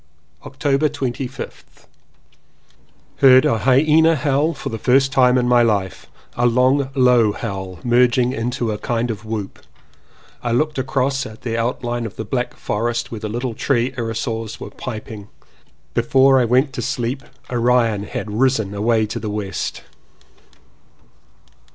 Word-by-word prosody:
October 140 +2 0
25th. 130 0 -6 1.3
Heard 130 0 +6
a 115 -7 +2
hyena 155 +6 +4
howl 145 +3 0
for - - -5
the 115 - -5
first 135 +3 +3
time 130 -2 +4
in 125 -1 +1
my 120 0 +5
life 100 -5 -1
— - - -31
a 120 0 +2
long 130 +3 +2
low 125 -5 +4
howl 95 -5 -5
merging 125 +1 +3
into 120 -1 -2
a 105 - -4
kind 120 +1 -1
of 110 0 -8
whoop. 110 -3 -5 0.8
I 120 - -1
looked 150 +3 0
across 135 0 0
at 110 - -13
the 115 -2 -2
out 115 +3 -2
line 120 -1 -2
of 105 - -12
the 110 - -5
black 125 +3 -3
forest 120 +2 -2
where 115 - -5
the 110 - -5
little 120 +2 -3
tree 125 +1 0
irrisors 115 -1 -4
were - - -8
piping. 110 -2 -7 0.7
Before 130 +3 +4
I 125 - +3
went 130 +4 +2
to - - -4
sleep 125 +3 -2 0.3
Orion 120 -4 +2
had 105 - -5
risen 110 -3 +1
away 110 +2 +1
to 105 - -5
the 110 - -4
west. 105 -2 -4
120 Hz, 150 wpm, -20 LUFS, 110-130 Hz, 1.3 s, Heard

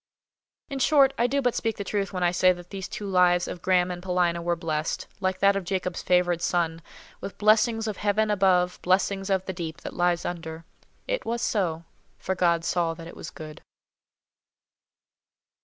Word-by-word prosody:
In 275 - -5
short, 275 0 +4
I 240 - +3
do 275 +2 0
but 245 -1 +2
speak 225 -2 -2
the 200 - -3
truth 200 0 -2
when 185 -2 -2
I 175 - +3
say 185 +1 +4
that 175 0 -13
these 195 -1 -5
two 210 - -6
lives 180 -2 +3
of 175 - -6
Graham 180 -1 +2
and 175 0 -6
Paulina 180 -2 0
were 170 0 0
blessed, 160 -2 -2
like 185 -1 -1
that 200 0 +5
of 195 - -2
Jacob's 180 -1 -3
favoured 175 -1 +2
son, 165 -2 0 0.4
with 195 - -7
"blessings 225 +1 +3
of 215 - -3
Heaven 210 +1 +1
above, 185 -3 +2
blessings 195 +1 +1
of 190 -1 +1
the 190 - -4
deep 165 -2 -6
that - - -7
lies 175 -1 +1
under." 165 -2 -6 0.4
It - - -1
was 235 +1 -2
so, 170 -6 0 0.3
for 190 - -2
God 170 -2 +1
saw 165 -2 0
that 165 0 -10
it 170 - -10
was - - -8
good. 155 -1 -10
180 Hz, 190 wpm, -26 LUFS, 175-200 Hz, 0.4 s, that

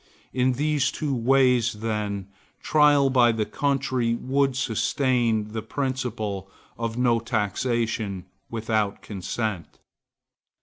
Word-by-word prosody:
In 130 0 +2
these 145 0 +1
two 145 -2 -2
ways, 125 -1 +3
then, 105 -3 -3 0.3
trial 145 -3 +4
by 120 -2 +5
the 110 -1 -1
country 130 -4 0
would 135 +2 0
sustain 120 -2 +1
the 110 +1 -4
principle 115 -8 -3 0.3
of 115 0 -3
no 120 -2 +3
taxation 110 -2 -1 0.2
without 110 -2 -1
consent. 105 -1 -4
120 Hz, 100 wpm, -25 LUFS, 110-130 Hz, 0.3 s, by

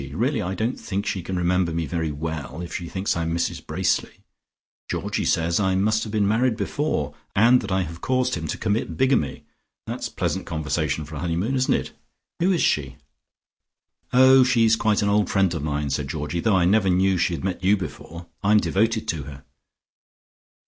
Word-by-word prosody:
Really 120 - 0
I 95 0 -3
don't 110 +6 -2
think 100 0 -3
she 95 - -2
can 95 +2 -5
remember 90 0 +1
me 80 0 -2
very 80 0 -2
well, 80 0 -5
if 85 - -8
she 85 -2 -5
thinks 95 +1 -1
I 85 - -1
am 80 0 -2
Mrs 85 - -2
Bracely. - - -1 0.7
Georgie - - -2
says 85 +2 +1
I 95 -2 +1
must 110 +3 +2
have 110 - -5
been 105 -2 +1
married 115 +2 +2
before, 105 - -2 0.2
and 120 +5 +5
that 100 -4 -6
I 95 0 +2
have 85 0 -8
caused 130 -1 0
him 85 -2 -3
to - - -3
commit 110 +1 -2
bigamy. 130 - +1 0.4
That's - - -4
pleasant - - -3
conversation 80 -1 -2
for 75 0 -8
a - - -5
honeymoon, 90 - -1
isn't 130 -1 +2
it? - - -3 0.5
Who 180 +3 +3
is 175 - +1
she?" 70 -3 0 1.2
"Oh, 130 +1 +7
she's 115 -3 +4
quite 110 -1 +1
an 100 - +1
old 105 -2 +2
friend 95 -3 +2
of 80 - -3
mine," 75 -1 -2
said 70 +1 -2
Georgie, 75 +2 -3
"though 110 +2 +2
I 85 - +3
never 95 +1 +3
knew 95 0 +2
she 85 - +1
had - - -7
met 90 -2 -3
you 100 +3 +4
before; 85 -2 -8 0.2
I'm 105 +1 +4
devoted 110 +2 0
to 80 -4 -2
her." 70 -2 -10
95 Hz, 195 wpm, -23 LUFS, 80-110 Hz, 1.2 s, Oh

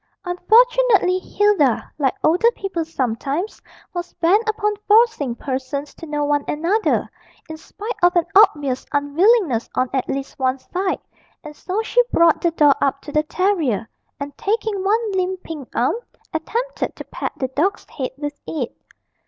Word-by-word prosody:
Unfortunately, 425 +1 +4
Hilda, 380 - +2
like 270 -3 +1
older 360 +9 +4
people 380 -4 -3
sometimes, 280 - -3 0.3
was 350 0 -5
bent 410 +7 +2
upon 420 -1 0
forcing 420 - +4
persons 270 +2 -4
to 330 - -10
know 295 -1 -1
one 290 0 +1
another, 350 +9 +1 0.4
in 315 - -7
spite 415 +8 -7
of 355 +1 +4
an 345 -2 +3
obvious 295 -11 +4
unwillingness 290 - +2
on 255 -1 0
at 265 -2 -1
least 275 +1 -4
one 260 0 +1
side, 370 +7 -3 0.4
and 300 -1 -9
so 385 +7 -3
she - - +3
brought 335 -1 +4
the 345 - +3
doll 300 -3 +5
up 275 0 +1
to 290 - -9
the 305 - +3
terrier, 310 - 0 0.3
and, 285 0 -6
taking 425 -2 -1
one 435 +2 +1
limp 375 -1 -1
pink 300 -6 -8
arm, 245 - +2 0.4
attempted 470 +11 -3
to - - -8
pat - - -5
the 260 - -2
dog's 365 +11 -1
head 260 -3 -4
with 290 0 -4
it. 270 -7 -4
335 Hz, 155 wpm, -21 LUFS, 285-410 Hz, 0.4 s, doll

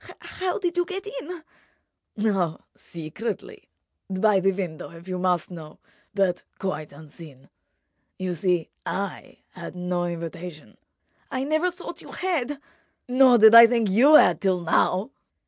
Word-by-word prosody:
"How—how 370 -1 -4
did 355 -4 -2
you 355 - +3
get 385 +2 -6
in?" 410 -7 -7 0.8
"Oh, 185 -7 0
secretly! 170 +8 -7 0.4
By 195 +1 +2
the 195 +1 +2
window, 180 -5 -5
if 170 +1 -14
you 185 -1 -4
must 180 -1 0
know; 160 -3 -10 0.4
but 190 -3 +1 0.2
quite 185 -6 -4
unseen. 145 -2 -14 0.7
You 185 -1 -3
see, 175 -1 -1
I 195 -1 -5
had 180 -1 -9
no 180 0 -2
invitation." 170 -1 -7 0.5
"I 260 -1 -3
never 310 +5 +1
thought 355 0 -9
you - - -12
had—" 295 -7 -2 0.5
"Nor 255 -1 +5
did 220 0 +7
I 230 0 +11
think 230 -4 0
you 265 +10 +6
had—till 180 - +4
now." 185 +6 +1
190 Hz, 135 wpm, -24 LUFS, 175-260 Hz, 0.8 s, I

